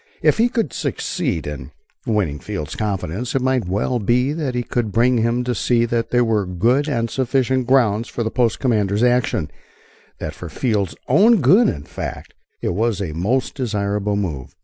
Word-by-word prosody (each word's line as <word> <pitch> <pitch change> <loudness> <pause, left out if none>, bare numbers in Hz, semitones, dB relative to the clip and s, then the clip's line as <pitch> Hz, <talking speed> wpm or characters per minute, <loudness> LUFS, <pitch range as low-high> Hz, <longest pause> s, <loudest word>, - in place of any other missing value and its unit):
If - - +3
he 235 +2 +4
could 235 -2 -1
succeed - - -2
in - - -6 0.4
winning 100 -10 0
Field's 75 +3 -5
confidence 105 +3 -3
it 135 - +2
might 130 -6 +1
well 105 +6 0
be 125 +6 +1
that 150 -6 -3
he 120 - 0
could 120 -3 -2
bring 120 +3 +3
him 115 +2 +1
to 125 0 -1
see 120 +1 +2
that 115 0 -1
there 120 -1 +3
were 105 -4 +1
good 120 - +1
and 115 -4 0
sufficient 130 0 0
grounds 120 -4 +3
for 120 - -3
the 110 - -2
post 120 -3 +1
commander's 105 -4 +1
action 120 -10 +1 0.7
that 75 - -5
for 85 - -8
Field's 105 - -1
own 225 +2 +5
good, 185 - +5
in 70 - -4
fact, - - -7 0.3
it - - -1
was 110 +2 0
a 90 -6 -3
most 115 +11 0
desirable 105 -4 -1
move. 80 -11 -4
115 Hz, 180 wpm, -20 LUFS, 100-125 Hz, 0.7 s, own